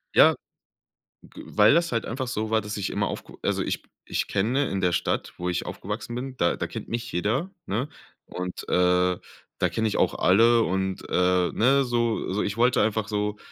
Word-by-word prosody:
Ja, - - +7 0.9
g - - -12
weil 105 +1 +5
das 170 -2 +2
halt 115 -1 0
einfach 130 +2 -3
so 110 -3 -2
war, 110 0 +3
dass 105 0 -6
ich 100 - -2
immer - - 0
aufk - - -7
also - - 0
ich - - -3 0.2
ich - - -2
kenne 125 +8 +1
in 95 - -2
der 90 -2 +2
Stadt, 85 +1 -1
wo 90 - -2
ich 90 0 -1
aufgewachsen 120 - -5
bin, 130 +1 -5
da 85 - +1
da - - -3
kennt - - -7
mich 115 0 -4
jeder, 115 - -1 0.2
ne? 115 +8 -2 0.4
Und, 90 0 -6
äh, 90 0 +3 0.4
da - - +3
kenne 110 0 0
ich 105 - -2
auch - - +2
alle 115 +5 +5
und, 95 0 -1
äh, 90 -1 +2
ne, 135 +4 +4
so 120 -4 0
so 105 - 0
ich 100 +2 -2
wollte 125 +1 +4
einfach 110 -1 0
so 105 0 -2
110 Hz, 200 wpm, -25 LUFS, 90-120 Hz, 0.9 s, Ja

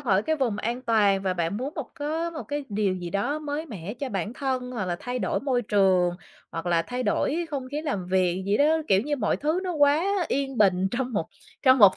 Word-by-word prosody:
khỏi 200 -6 +2
cái 315 +6 0
vùng 245 -8 0
an 240 +4 -2
toàn 205 -5 +3
và 185 -1 0
bạn 170 +3 -1
muốn 270 +6 -4
một - - -4
có 320 +3 -2
một 320 -2 -6
cái 290 0 -4
điều 200 -2 0
gì 175 -2 -5
đó 205 - 0
mới 300 +1 -4
mẻ 205 - -6
cho 270 +2 -4
bản 200 0 -3
thân, 255 -1 -2
hoặc 225 -6 -3
là 175 -1 -2
thay 250 0 -3
đổi - - -1
môi 255 -3 0
trường, 190 -4 +3 0.4
hoặc 165 +1 -5
là 170 -1 +3
thay 250 +7 -4
đổi 305 +9 0
không 270 -3 -3
khí 295 +2 -3
làm 205 - -2
việc 185 0 +1
gì 205 +1 +3
đó. 285 - +4 0.2
Kiểu 190 - +5
như 290 +1 -1
mọi 215 -6 +1
thứ 310 +5 0
nó 360 - -1
quá 295 +1 +4 0.2
yên 270 -3 -1
bình 190 -2 +4
trong 250 0 -2
một 165 -7 -1 0.4
trong 260 -1 +6
một 200 -3 +8
240 Hz, 240 wpm, -26 LUFS, 195-285 Hz, 0.4 s, một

